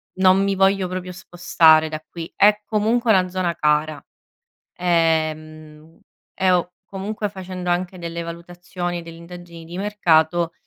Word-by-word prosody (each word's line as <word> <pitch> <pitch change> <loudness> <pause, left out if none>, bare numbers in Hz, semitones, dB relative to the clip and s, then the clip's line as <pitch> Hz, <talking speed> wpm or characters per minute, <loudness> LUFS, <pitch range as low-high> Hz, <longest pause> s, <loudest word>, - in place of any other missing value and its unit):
non 190 +1 +4
mi 200 0 0
voglio 195 -1 +2
proprio 185 0 -6
spostare 165 -3 +3
da 155 0 -7
qui. 165 -1 -8
È 210 +1 +4
comunque 225 +3 +1
una 185 -3 +3
zona 180 -2 -2
cara, 150 -1 0 0.7
ehm, 155 -2 -2 0.3
e 190 -1 +1
ho 180 0 +1
comunque 210 +2 -5
facendo 185 -2 -6
anche 180 +1 -2
delle 170 0 -5
valutazioni 175 +1 -6
delle 165 0 -11
indagini 170 -1 -12
di 170 +2 -8
mercato 175 -5 +1
175 Hz, 135 wpm, -21 LUFS, 165-190 Hz, 0.7 s, non